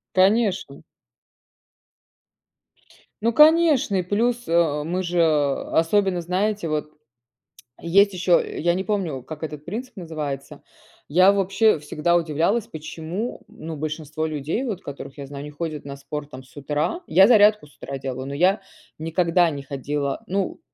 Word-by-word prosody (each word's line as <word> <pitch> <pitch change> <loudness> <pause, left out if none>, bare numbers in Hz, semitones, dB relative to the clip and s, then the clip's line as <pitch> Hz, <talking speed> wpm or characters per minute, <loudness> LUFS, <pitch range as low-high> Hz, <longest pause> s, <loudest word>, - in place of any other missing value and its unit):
Конечно. 190 -6 +2 2.4
Ну, 230 - +3
конечно 305 -6 +5
и - - +2
плюс, 230 +6 -1
э, 165 -3 +2
мы 180 +4 -2
же 175 -1 +1
Особенно, 165 +5 +1
знаете, 190 +2 -1
вот 150 -1 -2 0.9
есть 200 +4 +4
еще, 180 -1 +3 0.2
я 170 +2 +2
не 185 +2 -2
помню, 180 -9 -2
как 155 +4 -9
этот 150 -2 -6
принцип 230 +8 -6
называется. 150 -6 -6 0.5
Я 185 +6 +6
вообще 200 +1 +2
всегда 150 +3 0
удивлялась, 170 +7 +1
почему 160 +8 -6
ну 160 0 -8
большинство 155 +1 -4
людей 155 - -2
вот, 210 -8 -4
которых 140 0 -9
я 140 - -7
знаю 140 0 -7
не 150 - -8
ходят 155 -1 -5
на 140 -1 -6
спорт 150 +1 -7
там 130 -1 -9
с 130 - -22
утра? 150 - -2
Я 190 +2 +6
зарядку 210 -6 +5
с 145 - -23
утра 140 - -6
делаю, 130 -1 -5
но 140 - -5
я 180 +7 +2 0.4
никогда 170 +2 +2
не 140 -2 -5
ходила. 140 +1 -3
Ну, 195 - -2
165 Hz, 145 wpm, -23 LUFS, 150-195 Hz, 2.4 s, Я